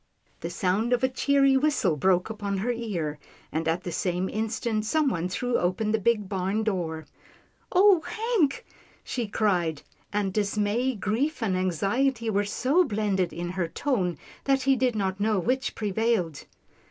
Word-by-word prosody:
The - - -4
sound 205 +6 0
of 245 +1 +1
a 260 - +4
cheery 275 +1 +3
whistle 285 - +2
broke 180 +6 +2
upon 205 -2 -3
her 225 +6 0
ear, 180 -11 -3 0.3
and 160 +1 -2
at 165 +3 0
the 175 - -4
same 180 +2 -1
instant, 220 0 -1
someone 235 - +1
threw 245 +6 0
open 185 +5 0
the 220 - +2
big 210 -1 +1
barn 195 +2 -1
door. 165 -7 -2 0.7
"Oh, 380 -2 +6
Hank!" 435 - 0 0.4
she 240 -3 -3
cried, 180 -7 0 0.3
and 200 -2 -1
dismay, 210 +5 0
grief 230 +8 -1
and 195 -4 +1
anxiety 220 - 0
were 205 0 +1
so 270 - +2
blended 205 - 0
in 175 +1 -4
her 180 -2 -1
tone, 180 - -1 0.3
that 270 -1 +2
he 270 +1 +4
did 250 -2 +1
not 190 -2 -1
know 215 0 +2
which 255 +8 -1
prevailed. 210 -7 -1
210 Hz, 155 wpm, -26 LUFS, 185-250 Hz, 0.7 s, Oh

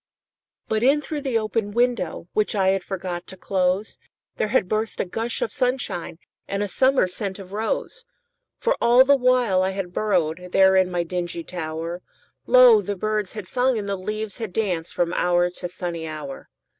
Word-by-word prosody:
But 220 0 0
in 275 +5 +4
through 295 0 -5
the 265 -5 0
open 215 -1 -1
window, 235 -9 0
Which 215 0 +1
I 190 -2 +3
had 190 -1 +1
forgot 180 -2 -5
to 190 - -9
close, 185 +2 -1 0.4
There - - 0
had 210 -4 +1
burst 215 +2 -2
a - - +1
gush 225 +6 -2
of 220 - -3
sunshineAnd 250 -10 -2 0.3
a 200 +1 -1
summer 260 0 +3
scent 190 +1 -5
of 190 -2 -11
rose. 220 - -3 0.5
For - - +1
all 245 +2 +6
the 280 +1 +6
while 250 -7 +3
I 190 - +1
had 190 -2 -4
burrowedThere 185 0 +3
in 185 - -2
my 175 -1 -1
dingy 175 -1 -4
tower, 165 0 -5 0.5
Lo! - - +7
the 205 - -3
birds 210 0 -2
had 210 -4 -6
sung 250 +4 +1
and 205 -2 -4
the 200 - -1
leaves 210 +2 -5
had 220 -6 -5
dancedFrom 175 -4 -1
hour 175 0 +2
to 180 0 -6
sunny 170 -2 -5
hour. 150 -3 -7
195 Hz, 175 wpm, -23 LUFS, 180-225 Hz, 0.5 s, Lo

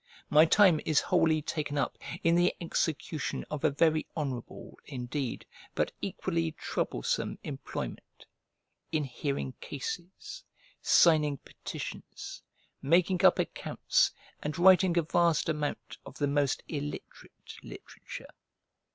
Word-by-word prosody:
My 155 +2 +8
time 175 -2 +5
is 155 -2 +3
wholly 160 -2 +2
taken 150 -2 -3
up 140 - 0 0.3
in 165 - +4
the 175 +1 +3
execution 160 -2 -2
of 150 -2 -4
a - - +5
very 155 +2 +2
honourable, 135 -6 -5
indeed, 130 -1 -4 0.3
but - - +1
equally 80 -1 -2
troublesome, - - -2
employment; - - -6 0.7
in 155 -2 +1
hearing 135 0 -3
cases, 175 - -6 0.4
signing 150 -4 +5
petitions, - - -8 0.4
making 180 +5 +3
up 190 - +7
accounts, - - +1 0.3
and 150 0 -3
writing 185 0 +6
a 170 - +4
vast 170 0 +2
amount 150 -2 -3
of 135 - -11
the 145 - +1
most 140 -1 +1
illiterate 145 -1 -7
literature. - - -10
155 Hz, 115 wpm, -30 LUFS, 145-170 Hz, 0.7 s, My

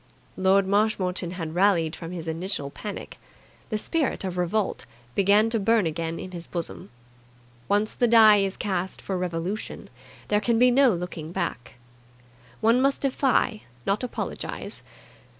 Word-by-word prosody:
Lord 190 +1 +3
Marshmoreton 190 -3 +1
had 165 -3 -5
rallied 175 -3 +2
from 165 - -8
his 170 -2 -6
initial 160 -3 -3
panic. 210 +6 -7 0.5
The 215 - -1
spirit 300 +2 -1
of 185 -2 -3
revolt 180 +4 -1 0.3
began 200 - +4
to 225 - +1
burn 225 0 +3
again 165 +1 -2
in 185 - -7
his 175 -2 -8
bosom. 170 -2 -5 0.8
Once 205 +2 +2
the 245 - +2
die 220 -2 +7
is 195 -1 0
cast 190 -3 -2
for 195 - -4
revolution, 180 +3 -4 0.4
there 210 0 +2
can 230 +2 +2
be 250 +2 +5
no 265 0 +5
looking 170 -3 -5
back. 165 -12 -4 0.9
One 230 +3 +4
must 275 +1 +2
defy, 260 -5 +1 0.2
not 200 +5 0
apologize. 250 - -5
195 Hz, 145 wpm, -25 LUFS, 175-215 Hz, 0.9 s, die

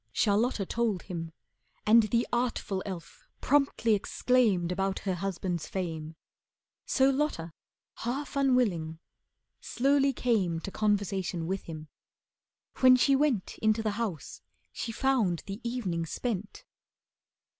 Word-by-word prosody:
Charlotta 210 0 +1
told 220 -4 -1
him. 165 -3 -6 0.5
And 225 +2 +7
the 235 +3 +1
artful 235 -5 -1
elf 195 - -8
Promptly 275 -6 +2
exclaimed 210 -4 +2
about 195 +1 -1
her 195 -2 -1
husband's 180 -2 -3
fame. 165 -4 -4 0.7
So 270 0 +4
Lotta, 265 - -2 0.4
half 270 +6 -4
unwilling, 230 - +1 0.6
slowly 275 +2 +2
came 210 -10 0
To 195 - -6
conversation 195 -4 0
with 190 +3 -3
him. 155 -2 -8 0.9
When 255 -1 +8
she 275 +2 +4
went 270 -8 0
Into 220 0 +2
the 215 - 0
house, 205 - -4 0.3
she 230 - -4
found 225 -9 +1
the 200 +4 -6
evening 195 -9 -2
spent. 215 - -4
210 Hz, 115 wpm, -29 LUFS, 180-250 Hz, 0.9 s, When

